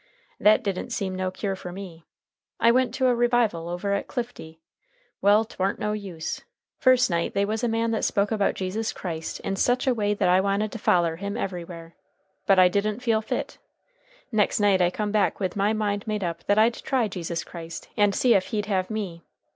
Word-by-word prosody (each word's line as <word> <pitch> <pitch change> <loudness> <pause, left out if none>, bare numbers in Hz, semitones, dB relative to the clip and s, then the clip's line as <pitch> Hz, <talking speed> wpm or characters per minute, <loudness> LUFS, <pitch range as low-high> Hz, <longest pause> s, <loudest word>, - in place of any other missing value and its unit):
That 215 +4 +5
didn't 195 +2 -3
seem 200 -6 -2
no 185 0 -2
cure 195 +1 -3
for 180 -1 -8
me, 175 -3 -9 0.5
I 230 - +5
went 255 +1 +2
to 260 - +1
a 250 - +4
revival 235 -8 +1
over 180 +3 -2
at 200 - -2
Clifty. 235 - -6 0.6
Well, 205 +2 +5
'twarn't 195 -3 -2
no 210 0 -2
use. 190 -6 -5 0.4
First 255 -5 +4
night 170 0 -1
they 200 - +2
was 220 +3 -2
a - - +3
man 230 0 0
that 220 - -1
spoke 200 0 +1
about 205 -3 +1
Jesus 200 +4 -2
Christ 165 -3 -5
in 195 - -3
sech 245 +6 +2
a 260 - +3
way 210 -3 0
that - - +1
I 180 +1 +5
wanted 200 +2 0
to 230 - -6
foller 170 -4 +2
him 200 +2 -4
everywhere. 170 -3 -6 0.5
But 195 - +5
I 185 -1 +8
didn't 210 +5 -1
feel 225 -3 +2
fit. 220 - -4 0.7
Next 215 -2 +2
night 200 -3 +3
I 175 - +4
come 210 +3 -3
back 210 -1 +1
with 185 -3 -2
my 205 +1 +2
mind 210 -1 -1
made 210 -2 -2
up 170 -1 -4
that 205 - +2
I'd 225 +2 +5
try 250 -1 0
Jesus 175 -3 -4
Christ, 165 -1 -8
and 205 -1 +3
see 250 -2 +4
ef 190 - +2
he'd 210 -2 -2
have 190 -3 -1
me. 200 -6 -4
200 Hz, 205 wpm, -25 LUFS, 185-220 Hz, 0.7 s, I